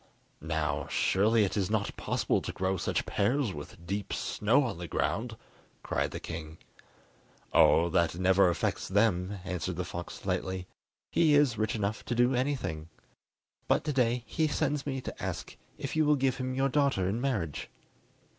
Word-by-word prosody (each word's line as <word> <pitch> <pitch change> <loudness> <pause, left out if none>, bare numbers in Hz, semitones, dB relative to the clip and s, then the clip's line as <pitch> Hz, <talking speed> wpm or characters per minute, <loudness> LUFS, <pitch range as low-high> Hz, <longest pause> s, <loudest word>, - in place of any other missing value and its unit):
"Now, 80 0 -1
surely 110 +3 +3
it 95 - -1
is 100 -2 0
not 105 -2 -1
possible - - 0
to - - -4
grow 95 +1 -1
such 90 - -1
pears 115 +2 +1
with 75 +3 -10
deep 100 +3 -3
snow 120 +8 +2
on 115 -9 -3
the 85 - -5
ground?" 110 +7 -1 0.5
cried - - 0
the - - -6
king. 80 -1 -7 1.0
"Oh, 85 +1 +6
that 85 -1 +2
never 95 0 +4
affects 85 - -1
them," 100 -1 +1
answered 90 0 -3
the 90 +1 -3
fox 85 0 -7
lightly; 95 -1 -2 0.5
"he 155 -3 +4
is 145 -5 +4
rich 110 +1 -1
enough 105 +1 -2
to 120 - -2
do 120 +2 +3
anything. 120 - -2 0.8
But - - +2
to 150 -1 -1
day 125 -2 +1
he 160 -1 0
sends 145 -1 -1
me 135 -2 -2
to - - -7
ask - - -4 0.2
if - - -4
you 155 - +4
will 150 0 +5
give 135 -2 +1
him 130 0 -3
your 135 +1 +2
daughter 140 -10 +2
in 110 +5 -1
marriage?" 105 - -2
105 Hz, 170 wpm, -30 LUFS, 90-130 Hz, 1.0 s, Oh